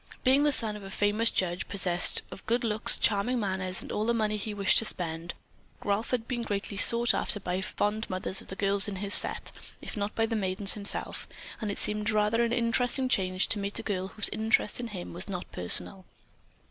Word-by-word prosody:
Being 265 +2 +4
the 295 - +3
son 220 -6 +6
of 210 - -9
a 195 - -9
famous 205 +3 +1
judge, 180 -1 -2
possessed 180 -3 +3
of - - -10
good 235 +2 0
looks, 215 -2 +3
charming 225 +4 +1
manners 190 -3 0
and - - -9
all 210 - -2
the 235 - +1
money 215 -2 0
he 210 +1 -2
wished 200 -2 +3
to 225 - -4
spend, 170 -3 -4 0.5
Ralph 205 +2 -1
had 240 -2 -2
been 245 -2 -3
greatly 205 -2 -4
sought 235 +4 +5
after 205 - -1
by 180 -2 -3
the - - -3
fond 210 +2 -2
mothers 185 +1 0
of - - -16
the 190 - -8
girls 200 +1 +1
in 205 - -4
his 200 +1 -2
set, - - +3 0.3
if - - -7
not 205 0 -4
by 225 - +1
the 225 0 -3
maidens 195 -1 +1
themselves, 205 -1 -1 0.3
and 215 - -3
it 200 - -4
seemed 210 0 0
rather 215 +1 +1
an 235 - -1
interesting 245 +2 0
change 185 -5 0
to 215 - 0
meet 200 0 -4
a 225 - -3
girl 190 -3 -3
whose 205 +1 +1
interest 220 0 0
in 240 - -4
him 190 -5 -8
was 180 +4 -5
not 180 -2 -5
personal. 185 - -1
205 Hz, 220 wpm, -28 LUFS, 190-225 Hz, 0.5 s, son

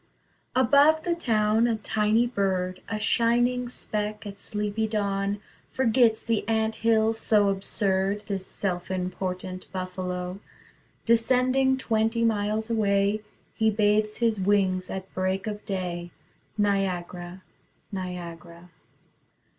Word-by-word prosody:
Above 285 +5 +5
the 345 - +1
town 225 -7 +2
a 230 - +1
tiny 215 +2 +1
bird, 185 -5 -1
A 220 - -1
shining 240 +3 +2
speck 210 -3 -3
at 200 -1 -8
sleepy 210 +1 -2
dawn, 200 -1 -1 0.3
Forgets 235 -3 +3
the 230 -2 0
ant 220 0 0
hill 225 -1 +3
so 210 -2 +3
absurd, 195 0 0
This 195 -2 -4
self 180 -3 -3
important 185 0 -4
Buffalo. 185 0 -4 0.7
Descending 255 +3 +3
twenty 225 -1 +1
miles 215 0 0
away 200 -1 +2 0.3
He 220 0 +2
bathes 210 0 +2
his 225 -4 +1
wings 190 -2 +1
at 190 0 -6
break 185 +1 -1
of 210 -1 -5
day 175 -3 -3 0.5
Niagara, 185 -3 -1 0.5
Niagara. 175 -2 -7
210 Hz, 110 wpm, -26 LUFS, 185-225 Hz, 0.7 s, Above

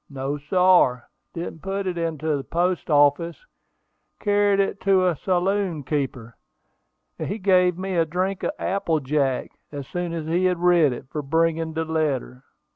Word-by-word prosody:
"No, 140 +1 -4
sar; 150 -6 +3 0.3
didn't 165 -1 -6
put 195 +1 -3
it 185 -1 -2
into 160 -2 -1
the 140 - -4
post 175 +3 -1
office; 150 - +2 0.7
car'ed 205 -1 +2
it 200 0 0
to 190 -1 +3
a 180 -2 +2
saloon 185 -1 -1
keeper, 130 -5 -3 0.8
and - - -3
he 205 - -3
gave 180 -3 +3
me 190 0 -3
a 165 - +4
drink 185 +4 -2
of - - -1
apple 175 -4 0
jack, 135 -2 -1 0.2
as 140 -2 -7
soon 175 -1 -3
as 165 -2 -4
he 175 +3 +1
had 180 -1 +2
read 175 -4 +4
it, 125 - -7
for 150 - -3
bringin' 165 +2 0
de 160 0 -2
letter." 145 -5 -2
165 Hz, 165 wpm, -23 LUFS, 145-185 Hz, 0.8 s, a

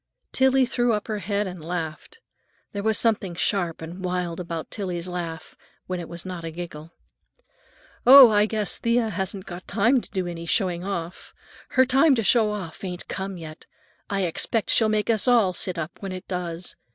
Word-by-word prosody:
Tillie 265 0 +4
threw 240 -1 +1
up 210 -1 -2
her 215 -2 -2
head 200 +2 -1
and 180 -4 -7
laughed; 165 - -5 0.5
there 200 - -4
was 220 0 +1
something 205 -6 +1
sharp 175 -3 -1
and 175 +4 -8
wild 180 -2 -2
about 170 -2 -5
Tillie's 180 -4 -4
laugh—when 175 +1 -7
it 170 - -7
was 170 +1 -8
not 180 -2 -6
a 165 - -4
giggle. 165 -1 -8 1.1
"Oh, 260 -2 +10
I 210 0 +4
guess 215 -3 -2
Thea 235 -1 +1
hasn't 190 -1 -4
got 175 0 -9
time 230 +6 +3
to - - -10
do 190 -3 -2
any 170 -1 -6
showing 180 -2 0
off. 180 -3 -5 0.4
Her 260 - +7
time 270 +3 +4
to 225 - 0
show 220 0 +4
off 200 -6 -6
ain't 180 -2 -5
come 190 -1 -4
yet. 155 -1 -10 0.4
I 200 -1 0
expect 195 +5 -1
she'll 220 -2 +4
make 215 +1 +1
us 220 +2 +1
all 225 -7 +4
sit 180 -1 -3
up 165 +1 -6
when 195 -2 -5
it 185 +1 -7
does. 175 -1 -5
190 Hz, 185 wpm, -24 LUFS, 175-220 Hz, 1.1 s, Oh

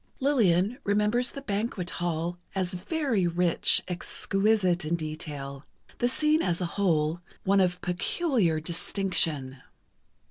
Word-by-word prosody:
Lillian 230 - +2
remembers 210 +5 +2
the 275 - -8
banquet 200 -5 -2
hall 175 +1 -2 0.2
as 185 -1 -1
very 225 - 0
rich, 170 0 +3
exquisite 185 0 0
in 155 +3 0
detail—the 150 - -5
scene 305 +4 +3
as 175 -1 0
a 180 - -1
whole, 165 -4 +1 0.2
one 195 0 +3
of 180 -1 +1
peculiar 180 - 0
distinction. 160 -5 0
180 Hz, 110 wpm, -27 LUFS, 165-210 Hz, 0.2 s, rich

